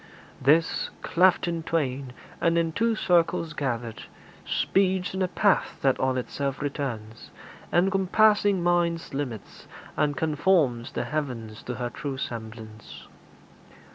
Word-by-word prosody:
This, 155 +5 +3
cleft 180 +1 +3
in 170 -1 -2
twain, 140 -6 -2 0.3
and 170 0 +3
in 165 -1 +1
two 230 +6 +1
circles 170 -4 +1
gathered, 120 -6 -3 0.4
Speeds 190 -1 +1
in 190 - -3
a 185 - +2
path 190 +2 +1
that 135 -2 +3
on 130 0 +1
itself 135 +2 -3
returns, 125 -7 -5 0.4
Encompassing 195 +1 +3
mind's 170 -2 +1
limits, 130 -7 -6 0.3
and 145 -2 0
conforms 150 -5 +1
The - - -1
heavens 120 -5 -4
to 125 - -4
her 120 0 -3
true 140 -2 -5
semblance. 110 -3 -8
150 Hz, 120 wpm, -26 LUFS, 125-175 Hz, 0.4 s, This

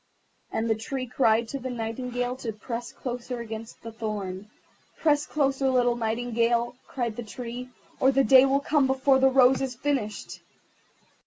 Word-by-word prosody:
And 225 - -1
the 225 - +3
Tree 255 +4 -4
cried 230 -2 +2
to 275 - -4
the 260 0 -5
Nightingale 245 +1 -3
to 240 -3 -4
press 230 +3 -6
closer 245 -1 -5
against 225 -1 -8
the 230 - -7
thorn. 210 -3 -5 0.5
"Press 300 -2 +2
closer, 270 -2 +1
little 245 -2 +3
Nightingale," 235 +1 0
cried 235 -4 -3
the - - -3
Tree, 245 +2 -7 0.3
"or 265 - +5
the 270 0 +3
Day 265 0 +7
will 275 +1 +2
come 285 -1 +2
before 265 0 +3
the 265 0 +5
rose 265 0 +5
is 260 -2 -2
finished." 240 -6 -3
245 Hz, 160 wpm, -26 LUFS, 230-265 Hz, 0.5 s, Day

